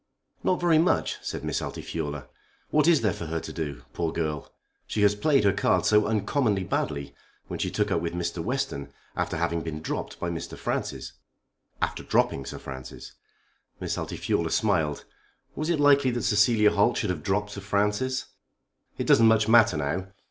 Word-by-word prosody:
"Not 185 - +2
very 170 -3 +4
much," 170 - +2
said - - -5
Miss - - -1
Altifiorla. 75 -4 -5 0.4
"What 150 0 +3
is 165 -6 +5
there 105 -5 +1
for 85 - -6
her 80 +1 -2
to - - -7
do? 75 -6 -5
Poor 85 -2 -1
girl! 75 -3 -3 0.4
She 105 - 0
has 105 0 +5
played 135 +4 +2
her 100 -1 +4
cards - - +2
so 105 -1 +4
uncommonly 105 -1 +1
badly, 70 -5 -2 0.3
when - - -6
she - - 0
took 105 -1 -1
up 85 - +1
with 85 -1 -3
Mr. 85 -1 -2
Western 120 - -3 0.2
after - - -1
having 85 0 0
been 80 -1 -5
dropped 80 - -5
by 85 -1 -2
Sir - - -8
Francis." - - -3 0.7
"After - - -1
dropping 70 - +1
Sir - - -6
Francis!" 65 -1 -9 0.7
Miss - - -2
Altifiorla 85 -1 -1
smiled. 80 -9 +1 0.5
Was 155 +2 -2
it 170 -3 +1
likely 140 -2 +5
that 120 -2 -2
Cecilia 105 0 +4
Holt 105 +4 +2
should 105 - 0
have 85 -4 -4
dropped 105 +4 -1
Sir 100 - -7
Francis? 105 +6 0 0.7
"It - - -2
doesn't 115 - +6
much 110 -1 +4
matter 115 -6 +6
now. 80 +6 -2
100 Hz, 175 wpm, -26 LUFS, 80-115 Hz, 0.7 s, doesn't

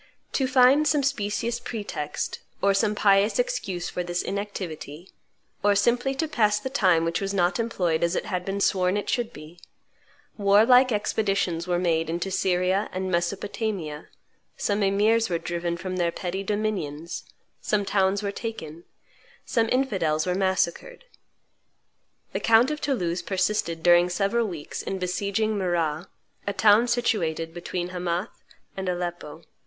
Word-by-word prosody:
To 265 - +1
find 265 +3 +5
some 295 -1 +2
specious 235 -3 -1
pretext, 210 -11 -4 0.2
or 200 0 +3
some 210 +1 +1
pious 200 +1 +3
excuse - - -2
for 180 - -3
this 175 0 -2
inactivity, 175 -5 -6 0.5
or 205 0 +4
simply 245 +6 +2
to 320 +3 -1
pass 210 -8 +2
the 260 +4 -5
time 180 -10 +3
which 165 +3 -1
was 195 0 -2
not 180 +3 +1
employed 180 -9 0
as 170 +1 +1
it - - -2
had 180 -3 -2
been 195 +2 -3
sworn 185 0 +2
it 205 - -3
should 240 -1 -1
be, 160 -1 -12 0.8
war 200 +2 +5
like 255 +1 +6
expeditions 200 -5 0
were 175 -1 +1
made 165 -2 0
into 175 +3 -2
Syria 185 +1 +1
and 185 0 -3
Mesopotamia; 175 -2 -2 0.5
some 205 0 0
emirs 210 +3 +3
were 170 - 0
driven 170 0 -3
from 185 +1 -4
their 170 -1 +1
petty 185 +2 -4
dominions; 190 -7 -3 0.4
some 205 -1 0
towns 195 +1 +1
were 200 - -1
taken; 170 -8 -7 0.6
some 225 -1 +1
infidels 185 -12 +1
were 180 - 0
massacred. 190 - -1 1.3
The - - -1
count 230 +5 +4
of 300 0 -4
Toulouse 180 -11 -1
persisted 185 -4 -1
during 175 0 +5
several 200 +5 0
weeks 165 -6 -6
in 195 - -4
besieging 200 +3 -1
Marrah, 175 -2 -1 0.4
a 200 - 0
town 215 +3 +5
situated 170 -9 0
between 175 +1 -4
Hamath 180 +2 -3 0.3
and 190 -1 -3
Aleppo. 175 -4 -4
195 Hz, 150 wpm, -25 LUFS, 175-215 Hz, 1.3 s, like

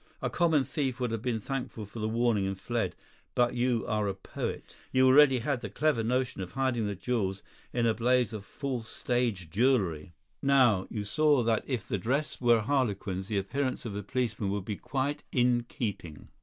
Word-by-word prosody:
A - - -2
common 165 -5 +3
thief 130 -1 -2
would 125 -2 -1
have 115 -2 -2
been 120 -2 -1
thankful 125 -2 -4
for 105 +3 -9
the 110 0 -1
warning 115 -3 +1
and 95 0 -4
fled; 120 +4 -2 0.4
but 120 0 +3
you 120 -1 +1
are 105 -1 0
a 100 - -2
poet. 95 - -6 0.2
You 130 0 +4
already 135 0 +7
had 125 +1 -1
the 105 - -5
clever 145 +3 +1
notion 125 -1 -1
of 90 -1 -6
hiding 125 -4 0
the 100 - -3
jewels 100 -2 -2 0.3
in 120 -1 +1
a 115 - +3
blaze 125 +1 +2
of 105 -2 -5
false 125 -1 -4
stage 115 -9 -1
jewellery. 95 - +1 0.3
Now, 130 -9 +4
you 105 -3 -3
saw 145 +4 +3
that 115 -1 +1
if 125 -7 -2
the 100 - -1
dress 140 +10 -1
were 120 -1 +5
a - - -1
harlequin's 100 -7 -1
the 105 - -1
appearance 130 +7 -2
of 105 -4 -4
a 105 - -3
policeman 110 -2 -2
would 100 -1 -2
be 105 - -3
quite 140 +6 -2
in 120 -2 +2
keeping. 90 - -5
120 Hz, 195 wpm, -29 LUFS, 105-130 Hz, 0.4 s, already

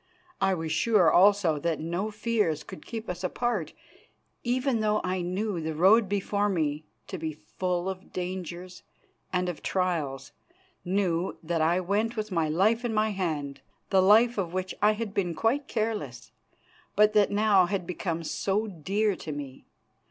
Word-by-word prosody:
I 195 -1 +3
was 160 -2 -4
sure, 190 0 +4
also, 185 -5 +4
that 165 +1 -1
no 175 +6 -2
fears 210 -7 0
could 150 - -11
keep 225 -1 -6
us 180 +1 -5
apart, 200 -4 -1 0.7
even 250 0 +1
though 215 0 +2
I 185 0 -1
knew 185 +1 -2
the 160 0 -3
road 195 +5 +5
before 205 +1 0
me 155 -4 -1 0.2
to 185 - -6
be 160 0 -3
full 175 +4 -3
of 190 0 -6
dangers 180 0 -5 0.5
and 180 -1 0
of 175 -4 -4
trials, 155 -8 -2 0.5
knew 185 -1 0
that 165 0 -1
I 170 +3 +3
went 210 +5 0
with 215 -1 -3
my 165 -3 +1
life 210 +9 +2
in 235 -2 -1
my 215 0 +2
hand, 155 -8 -3 0.3
the 190 -1 +5
life 220 +4 +5
of 175 -3 -2
which 185 0 -2
I 210 +1 +5
had 215 -2 -4
been 175 -5 -1
quite 265 - 0
careless, 205 - -3 0.6
but 210 +1 +5
that 210 -2 +4
now 205 -3 +4
had 190 -1 -2
become 170 -1 -3
so 200 +6 -1
dear 200 +2 -1
to 155 - -6
me. 140 -3 -7
185 Hz, 165 wpm, -27 LUFS, 165-210 Hz, 0.7 s, road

